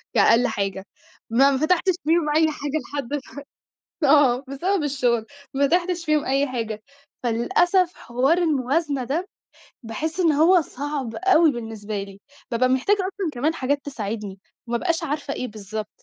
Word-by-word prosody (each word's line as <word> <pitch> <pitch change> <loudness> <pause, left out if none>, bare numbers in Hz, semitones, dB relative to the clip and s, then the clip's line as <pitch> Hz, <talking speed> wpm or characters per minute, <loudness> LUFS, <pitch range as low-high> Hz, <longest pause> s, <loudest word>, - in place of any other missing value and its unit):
كأقل 240 +2 +5
حاجة، 195 -1 -3 0.4
ما 270 +5 +5
ما 265 - +1
فتحْتش 365 +5 +2
فيهم 320 -1 +2
أي 320 0 +5
حاجة 290 -1 -5 0.2
لحد 280 -4 -3
دلوقت 285 0 -3 0.8
آه، 275 -3 +5
بسبب 335 +6 -1
الشغل، 245 -5 0 0.3
ما 280 +1 +2
فتحْتش 350 0 0
فيهم 305 -1 +1
أي 275 +2 +1
حاجة. 225 -4 -4 0.4
فللأسف 345 - +2
حوار 260 +8 +1
الموازنة 290 -3 0
ده، 320 +10 -2 0.6
باحسّ 310 - -4
إن 330 -3 +4
هو 330 +4 +5
صعْب 280 -4 -5
أوي 335 -4 +4
بالنسبة 220 -4 -5
لي، 195 0 -12 0.3
بابقى 255 +2 +2
محتاجة 265 +11 +2
أصلًا 380 -2 -2
كمان 295 +7 0
حاجات 280 -1 -1
تساعدني، 210 -6 -5 0.3
وما 235 0 0
ابْقاش 335 +4 -1
عارفة 290 -1 -3
إيه 255 - -4
بالضبط. 215 0 -6
280 Hz, 150 wpm, -23 LUFS, 235-325 Hz, 0.8 s, كأقل